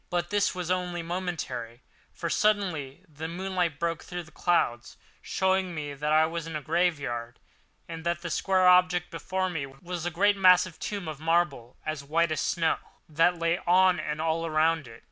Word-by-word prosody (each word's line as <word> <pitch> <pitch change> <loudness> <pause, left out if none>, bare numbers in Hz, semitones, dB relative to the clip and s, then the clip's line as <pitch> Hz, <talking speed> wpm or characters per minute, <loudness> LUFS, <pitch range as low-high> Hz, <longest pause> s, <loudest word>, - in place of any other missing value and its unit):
But 175 0 -2
this 205 -2 +1
was 180 -1 -3
only 180 -2 -1
momentarily; 165 -9 -4 0.3
for - - -5
suddenly 180 -10 0
the 155 +1 -7
moonlight 180 -2 -2
broke 165 +1 -2
through 175 -1 -6
the 160 - -17
clouds, 120 -9 0 0.2
showing 190 -2 0
me 145 -2 -4
that 150 +2 -2
I 155 +1 +5
was 165 0 -4
in 165 - -6
a 150 - -3
graveyard, 145 -9 -1 0.5
and 165 -1 -7
that 170 0 -1
the 170 - -4
square 185 -1 +2
object 180 -1 +4
before 185 +3 -2
me 160 -6 -3
was 170 +6 -7
a - - +1
great 200 +4 +2
massive 185 -2 +5
tomb 200 -5 -4
of 155 -3 -6
marble, 155 -7 0
as 155 -2 -3
white 160 +3 +1
as 155 - -1
the - - 0
snow 165 -2 +1 0.3
that 165 +3 +2
lay 170 +1 +1
on 185 +1 +5
and 150 0 -3
all 165 +1 0
around 160 -1 +1
it. 115 0 -12
170 Hz, 185 wpm, -28 LUFS, 155-180 Hz, 0.5 s, I